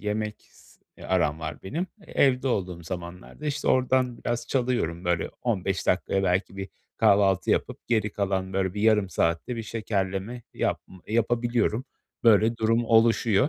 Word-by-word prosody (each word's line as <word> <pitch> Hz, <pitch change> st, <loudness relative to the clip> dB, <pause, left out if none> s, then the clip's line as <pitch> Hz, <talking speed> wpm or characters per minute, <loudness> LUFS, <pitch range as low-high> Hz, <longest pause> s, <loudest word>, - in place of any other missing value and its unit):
yemek 105 Hz, 0 st, -2 dB, 0.2 s
s -, -, -22 dB, 0.2 s
eee, -, -, -11 dB
aram 80 Hz, -4 st, +1 dB
var 80 Hz, +1 st, -6 dB
benim. 165 Hz, -, -3 dB, 0.2 s
Evde 130 Hz, -1 st, +2 dB
olduğum 90 Hz, -6 st, -2 dB
zamanlarda, 90 Hz, -, -7 dB
işte, 145 Hz, 0 st, -1 dB
oradan 130 Hz, -1 st, +2 dB
biraz 120 Hz, 0 st, -2 dB
çalıyorum, 120 Hz, -10 st, -1 dB
böyle, 85 Hz, -2 st, 0 dB
15 95 Hz, -5 st, -1 dB
dakikaya 95 Hz, +1 st, +1 dB
belki 95 Hz, +1 st, 0 dB
bir 95 Hz, 0 st, -5 dB, 0.3 s
kahvaltı 100 Hz, -2 st, +3 dB
yapıp -, -, -1 dB
geri 110 Hz, -3 st, +1 dB
kalan, 95 Hz, -1 st, -1 dB
böyle, 95 Hz, 0 st, 0 dB
bir 105 Hz, -, -3 dB
yarım 105 Hz, -3 st, +4 dB
saatte 85 Hz, +9 st, 0 dB
bir 115 Hz, -, -3 dB
şekerleme 105 Hz, +1 st, -3 dB
yapm -, -, -2 dB, 0.2 s
yapabiliyorum. 120 Hz, +1 st, +1 dB, 0.4 s
Böyle 115 Hz, +1 st, +5 dB
durum 115 Hz, +1 st, +2 dB
oluşuyor, 115 Hz, +1 st, +4 dB
105 Hz, 145 wpm, -26 LUFS, 95-120 Hz, 0.4 s, Böyle